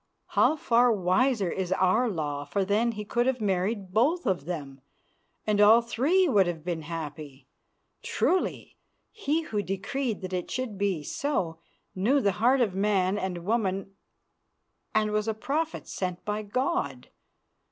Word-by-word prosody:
How -, -, +3 dB
far 245 Hz, -4 st, +3 dB
wiser 200 Hz, +1 st, +2 dB
is 185 Hz, -1 st, -3 dB
our 190 Hz, +7 st, +2 dB
law, 145 Hz, -6 st, -3 dB
for 190 Hz, +7 st, -1 dB
then 220 Hz, +4 st, +1 dB
he 210 Hz, -1 st, -6 dB
could 240 Hz, +4 st, 0 dB
have 260 Hz, -1 st, +1 dB
married 195 Hz, -1 st, -1 dB
both 295 Hz, -, +2 dB
of 180 Hz, -7 st, 0 dB
them, 140 Hz, -6 st, -6 dB, 0.6 s
and 210 Hz, -1 st, +2 dB
all 220 Hz, +3 st, +7 dB
three 295 Hz, +11 st, +2 dB
would 200 Hz, -, +4 dB
have 165 Hz, -3 st, -4 dB
been 170 Hz, -3 st, -2 dB
happy. 150 Hz, -4 st, -7 dB, 0.6 s
Truly 370 Hz, -, -1 dB, 0.4 s
he 330 Hz, -7 st, -1 dB
who 210 Hz, -9 st, -2 dB
decreed 210 Hz, +5 st, -3 dB
that 185 Hz, 0 st, -6 dB
it 180 Hz, -1 st, -3 dB
should 255 Hz, -4 st, -3 dB
be 195 Hz, -5 st, -1 dB
so 185 Hz, -, -2 dB, 0.3 s
knew 230 Hz, +10 st, +2 dB
the 200 Hz, -7 st, +2 dB
heart 255 Hz, +3 st, +4 dB
of 215 Hz, -6 st, +1 dB
man 195 Hz, 0 st, +1 dB
and 180 Hz, -3 st, -4 dB
woman 195 Hz, -3 st, -1 dB, 1.0 s
and 215 Hz, -1 st, +2 dB
was 210 Hz, 0 st, 0 dB
a 220 Hz, -, 0 dB
prophet 305 Hz, +8 st, -2 dB
sent 180 Hz, -2 st, -4 dB
by 210 Hz, +1 st, -2 dB
God. 200 Hz, -, -2 dB
205 Hz, 150 wpm, -27 LUFS, 180-240 Hz, 1.0 s, all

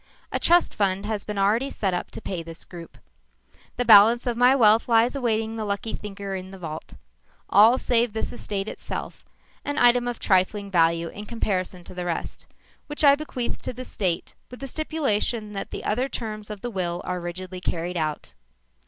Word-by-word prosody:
A -, -, -1 dB
trust 345 Hz, 0 st, +4 dB
fund 195 Hz, -1 st, 0 dB
has 215 Hz, -2 st, -2 dB
been 210 Hz, -1 st, -5 dB
already 215 Hz, +7 st, +2 dB
set 195 Hz, -8 st, -1 dB
up 175 Hz, -, -3 dB
to -, -, -8 dB
pay 180 Hz, -3 st, -4 dB
this 165 Hz, 0 st, -9 dB
group. 170 Hz, -2 st, -11 dB, 0.8 s
The 245 Hz, -, 0 dB
balance 225 Hz, +2 st, +7 dB
of 240 Hz, -2 st, 0 dB
my 250 Hz, +3 st, +5 dB
wealth 225 Hz, -2 st, +4 dB
lies 230 Hz, +3 st, +4 dB
awaiting 225 Hz, -3 st, -1 dB
the 220 Hz, -, -2 dB
lucky 205 Hz, +2 st, -2 dB
thinker 200 Hz, -1 st, -6 dB
in 185 Hz, 0 st, -5 dB
the 195 Hz, -, -10 dB
vault 160 Hz, -3 st, -7 dB, 0.6 s
all 220 Hz, +6 st, +7 dB
save 240 Hz, -3 st, +2 dB
this 220 Hz, -, -3 dB
estate 205 Hz, -4 st, -4 dB
itself, -, -, -6 dB, 0.4 s
an 290 Hz, 0 st, -3 dB
item 245 Hz, -1 st, +4 dB
of 240 Hz, -1 st, -3 dB
trifling 200 Hz, +1 st, +1 dB
value 165 Hz, -1 st, +2 dB
in 205 Hz, +4 st, -9 dB
comparison 185 Hz, -5 st, -2 dB
to -, -, -12 dB
the 180 Hz, -1 st, -5 dB
rest, 170 Hz, -2 st, -4 dB, 0.4 s
which 295 Hz, +1 st, -2 dB
I 280 Hz, -1 st, +8 dB
bequeath 275 Hz, -5 st, -4 dB
to -, -, -5 dB
the 255 Hz, +1 st, -7 dB
State 180 Hz, -8 st, -2 dB, 0.2 s
with 250 Hz, -, -10 dB
the 275 Hz, -, -4 dB
stipulation 245 Hz, -8 st, -1 dB
that 195 Hz, -1 st, -5 dB
the -, -, -6 dB
other 250 Hz, +6 st, 0 dB
terms 215 Hz, -4 st, -5 dB
of 210 Hz, -2 st, -7 dB
the 245 Hz, -, -4 dB
will 175 Hz, -3 st, -2 dB
are 180 Hz, -1 st, -3 dB
rigidly 180 Hz, +1 st, -6 dB
carried 175 Hz, 0 st, -2 dB
out. 155 Hz, -, -3 dB
210 Hz, 190 wpm, -25 LUFS, 185-240 Hz, 0.8 s, I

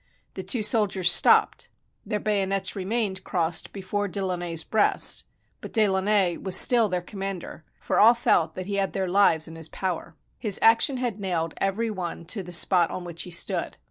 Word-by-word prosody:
The -, -, -6 dB
two 240 Hz, -5 st, -1 dB
soldiers 200 Hz, -5 st, +2 dB
stopped. -, -, +3 dB, 0.4 s
Their 210 Hz, -, -2 dB
bayonets 195 Hz, -2 st, -1 dB
remained 200 Hz, 0 st, -2 dB
crossed 165 Hz, -2 st, -2 dB
before 205 Hz, +1 st, -4 dB
De 200 Hz, +1 st, -5 dB
Launay's 175 Hz, -3 st, -3 dB
breast, 220 Hz, -2 st, +2 dB, 0.4 s
but -, -, -10 dB
De 220 Hz, -2 st, +3 dB
Launay 190 Hz, -2 st, +1 dB
was 190 Hz, -2 st, +1 dB
still 235 Hz, -4 st, +5 dB
their 180 Hz, -1 st, -2 dB
commander, 195 Hz, -3 st, -7 dB, 0.2 s
for -, -, -1 dB
all 230 Hz, +3 st, +6 dB
felt 165 Hz, -8 st, +1 dB
that 185 Hz, -, -6 dB
he 200 Hz, +1 st, -3 dB
had 195 Hz, -1 st, -1 dB
their 190 Hz, -1 st, -2 dB
lives 175 Hz, -4 st, +2 dB
in 165 Hz, -, -11 dB
his 160 Hz, -1 st, -5 dB
power. 170 Hz, -3 st, -5 dB, 0.2 s
His 210 Hz, -4 st, +1 dB
action 230 Hz, +4 st, +4 dB
had 240 Hz, -5 st, -3 dB
nailed 170 Hz, -4 st, -3 dB
every 215 Hz, +4 st, -1 dB
one 175 Hz, -4 st, -6 dB
to 210 Hz, -, -4 dB
the 180 Hz, -1 st, -10 dB
spot 175 Hz, 0 st, +3 dB
on 180 Hz, -, -6 dB
which 170 Hz, -1 st, -6 dB
he -, -, -6 dB
stood. 170 Hz, -, -2 dB
190 Hz, 185 wpm, -25 LUFS, 175-210 Hz, 0.4 s, all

